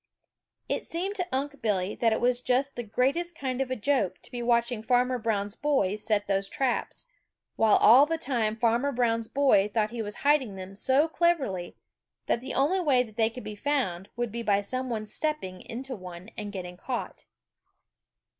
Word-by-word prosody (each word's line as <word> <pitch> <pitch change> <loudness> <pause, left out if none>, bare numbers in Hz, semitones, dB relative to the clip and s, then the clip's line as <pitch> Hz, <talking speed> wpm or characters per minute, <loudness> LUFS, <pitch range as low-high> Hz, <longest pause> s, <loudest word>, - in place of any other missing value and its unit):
It - - -2
seemed 365 +4 -3
to 360 -2 -2
Unc' 285 +2 -3
Billy 200 -3 0
that 230 -1 +1
it 220 - +1
was 245 0 +2
just 260 +3 +1
the 240 - -3
greatest 275 +10 -1
kind 260 -1 -2
of 265 - -1
a 255 - -1
joke 210 -6 0
to - - -13
be 245 -1 -4
watching 235 -1 +1
Farmer 250 +2 +2
Brown's 205 -2 -1
boy 270 -10 +1
set 210 -1 0
those 195 0 0
traps, 270 - -1 0.5
while 220 -2 +4
all 255 +7 +7
the 325 +1 0
time 235 -8 -1
Farmer 235 +4 +2
Brown's 230 -3 +1
boy 260 -8 +3
thought 215 0 0
he 235 -1 -4
was 210 -1 -5
hiding 275 -8 +3
them 190 0 -8
so 265 +9 +2
cleverly 290 - 0 0.5
that 235 - 0
the 260 +1 -6
only 300 +8 +2
way 275 -8 +3
they 220 -1 0
would 250 - -7
be 215 - -6
found 205 -7 -1
would 240 -2 -2
be 235 +2 -4
by 205 -3 +2
some 255 +6 -3
one 220 -2 -3
stepping 210 - -2
into 255 +3 -6
one 185 0 -10
and 210 -1 -5
getting 180 -3 -7
caught. 245 +5 -5
240 Hz, 185 wpm, -28 LUFS, 210-270 Hz, 0.5 s, all